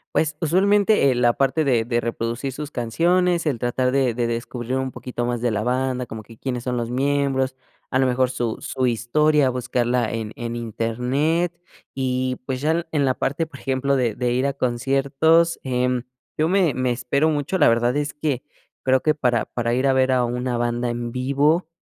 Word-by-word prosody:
Pues, 150 -1 +1
usualmente, 195 -1 +3
eh, - - 0
la 120 -1 +3
parte 140 +4 +1
de 120 -5 +2
de 120 +1 0
reproducir 120 +3 -3
sus 150 +2 -6
canciones, 170 +9 +1
el 140 -7 0
tratar 125 +1 0
de 130 -3 +2
de 120 0 -1
descubrir 120 +2 -3
un 130 -1 -2
poquito 120 -1 -4
más 120 -1 -2
de 120 - +1
la 105 0 -1
banda, 125 +1 -1
como 110 -1 -8
que 115 0 -15
quiénes 125 -3 -4
son 125 -1 -2
los 115 -1 -2
miembros, 135 0 0 0.4
a 130 - +2
lo 130 - +3
mejor 125 0 +2
su 120 -3 -2
su 130 -1 -1
historia, 140 +5 +2
buscarla 125 -1 0
en 110 -1 -4
en 120 0 -4
internet 125 +9 -1 0.4
y, 130 -1 -1
pues, 130 -1 -3
ya 160 +3 +1
en 145 - +2
la 130 -1 +2
parte, 145 +6 -1
por 145 -4 -13
ejemplo, 135 +1 0
de 120 -4 0
de 125 -1 -1
ir 130 +2 +1
a 140 - -1
conciertos, 135 +6 +2
em, 125 -1 0 0.3
yo 155 - +2
me 180 -4 +2
me 130 -1 0
espero 130 +5 +1
mucho. 150 +4 -1
La - - +5
verdad 120 +3 +2
es 145 0 -2
que 145 -4 -2 0.4
creo 130 0 +3
que 155 -1 +2
para 125 -5 +1
para 120 -1 -2
ir 130 +2 +1
a 135 - +4
ver 130 0 +3
a 125 -1 +2
una 125 +1 -2
banda 120 0 -1
en 120 0 -3
vivo 140 +6 +1
130 Hz, 200 wpm, -22 LUFS, 120-145 Hz, 0.4 s, La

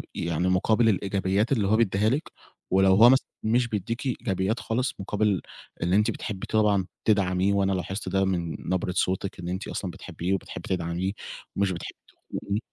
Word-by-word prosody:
يعني 85 +1 -1
مُقابل 110 +5 +3
الإيجابيات 100 +2 0
اللي 110 -7 +2
هو 105 - +4
بيدّيها 105 -1 +2
لِك، 145 +7 -2 0.4
ولو 95 0 +5
هو 115 +4 +8
مثلًا 130 +1 +4 0.2
مش 115 +2 +2
بيدّيكِ 115 +3 -3
إيجابيات 110 -4 -1
خالص 125 +3 -1
مقابل 100 -1 0 0.4
إن 90 +2 +1
أنتِ 105 +3 +4
بتحبي 100 -2 -5
طبعًا 105 -4 +2 0.2
تدعّميه، 95 -2 +2
وأنا 100 -1 +2
لاحظت 95 +1 -3
ده 95 +1 +2
من 85 -4 -1
نبرة 90 0 0
صوتِك 95 +1 -1
إن 85 - -6
أنتِ 95 +2 -4
أصلًا 95 - -4
بتحبّيه 90 +3 -4
وبتحبّي 95 - -5
تدعميه 90 +1 -1 0.4
ومش 100 -1 +1
بتحبّي 85 -2 -7
تخونيه، 100 +1 -5
95 Hz, 165 wpm, -26 LUFS, 95-110 Hz, 0.4 s, هو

